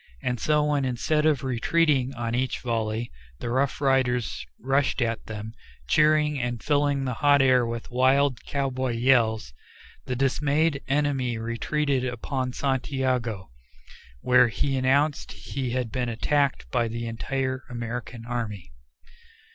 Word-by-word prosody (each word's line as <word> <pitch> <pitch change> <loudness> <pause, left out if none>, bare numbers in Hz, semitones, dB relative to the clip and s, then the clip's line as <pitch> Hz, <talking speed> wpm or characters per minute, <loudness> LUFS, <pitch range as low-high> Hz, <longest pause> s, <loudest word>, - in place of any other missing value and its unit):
And 125 -2 -1
so, 150 +5 +2
when 145 -2 +1
instead 150 +5 +1
of 145 -3 +1
retreating 135 +1 +1
on 115 -1 -3
each 130 +1 -1
volley, 115 -1 -2 0.3
the 120 - -4
Rough 130 +2 0
Riders 130 -4 +1
rushed 135 +2 +1
at 115 -2 -1
them, 110 0 -6 0.3
cheering 150 - +3
and 120 -1 -3
filling 145 -2 +1
the 125 - -1
hot 145 -1 +5
air 130 -3 +4
with 115 0 -5
wild 130 +1 +2
cowboy 130 -3 -2
yells, 115 - +2 0.5
the 125 - -1
dismayed 140 +3 +1
enemy 135 -4 0
retreated 130 +4 -1
upon 130 +1 -3
Santiago, 130 - -1 0.7
where 125 0 +5
he 135 +4 -1
announced 140 +3 +1
he 135 -2 -5
had 125 -3 -2
been 125 -2 -1
attacked 140 +4 0
by 120 -2 +1
the 115 +1 -4
entire 130 +3 -3
American 120 -1 -6
army. 110 - -4
130 Hz, 130 wpm, -26 LUFS, 120-140 Hz, 0.7 s, hot